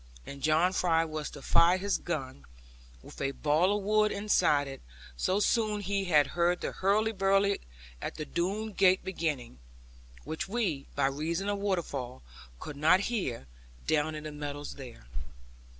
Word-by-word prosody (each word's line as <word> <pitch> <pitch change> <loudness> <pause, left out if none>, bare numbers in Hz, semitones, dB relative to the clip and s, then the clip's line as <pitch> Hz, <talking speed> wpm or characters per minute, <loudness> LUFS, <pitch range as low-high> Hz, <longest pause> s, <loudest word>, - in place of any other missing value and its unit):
And 140 0 -9
John 160 +5 +3
Fry 165 -3 +2
was 155 -1 -4
to 145 - -11
fire 170 +2 +5
his 200 +2 0
gun, 135 -5 -4 0.6
with - - -11
a 140 0 0
ball 160 +9 +2
of 205 - -5
wool 215 +1 +3
inside 185 -9 +2
it, 135 0 -8 0.3
so 185 - +1
soon 215 -1 +1
as - - -8
he 200 0 0
heard 170 +2 +2
the - - -2
hurly 210 +3 +2
burly 195 0 +2 0.4
at - - -4
the 155 - -5
Doone 200 +7 -2
gate 185 0 +4
beginning; 150 - -3 0.6
which 160 +4 -4
we, 195 -11 -1
by 140 - +2
reason 165 +8 -1
of 205 -1 -1
waterfall, 150 -11 -3 0.4
could 145 - -7
not 165 +6 +5
hear, 135 - -2 0.4
down 155 +1 +1
in 150 - -6
the 155 - -5
meadows 145 0 -5
there. 125 - -11
170 Hz, 160 wpm, -30 LUFS, 145-195 Hz, 0.6 s, fire